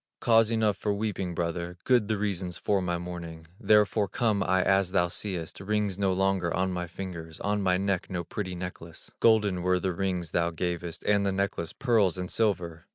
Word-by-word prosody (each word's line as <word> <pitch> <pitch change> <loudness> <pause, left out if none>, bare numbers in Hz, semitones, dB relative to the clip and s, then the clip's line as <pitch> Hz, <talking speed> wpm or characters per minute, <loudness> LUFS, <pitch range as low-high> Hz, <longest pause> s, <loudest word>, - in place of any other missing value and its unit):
"Cause 115 -2 +4
enough 110 -3 +1
for 105 0 -1
weeping, 100 -4 -3
brother, 85 +1 -3
Good 120 -5 +3
the 110 -1 0
reasons 95 -3 -2
for 100 -2 +1
my 90 -1 -1
mourning: 85 -2 -7
Therefore 105 -1 +3
come 110 -1 0
I 95 0 +2
as 95 -1 +2
thou 90 -2 +3
seest, 90 -3 -4
Rings 100 -1 -1
no 100 -1 +2
longer 95 -2 +1
on 95 +2 0
my 90 -1 -3
fingers, 85 -3 -7
On 105 0 0
my 90 -2 +2
neck 95 -1 -1
no 90 -2 -3
pretty 95 +1 -5
necklace; 85 -2 -8
Golden 105 -5 +3
were 90 +1 +2
the 95 0 -1
rings 90 -3 -2
thou 85 0 +1
gavest, 85 0 -4
And 100 -1 +2
the 100 - +1
necklace, 95 -4 -2
pearls 105 -8 +2
and 90 0 -4
silver!" 85 -6 -1
95 Hz, 190 wpm, -28 LUFS, 85-100 Hz, -, Cause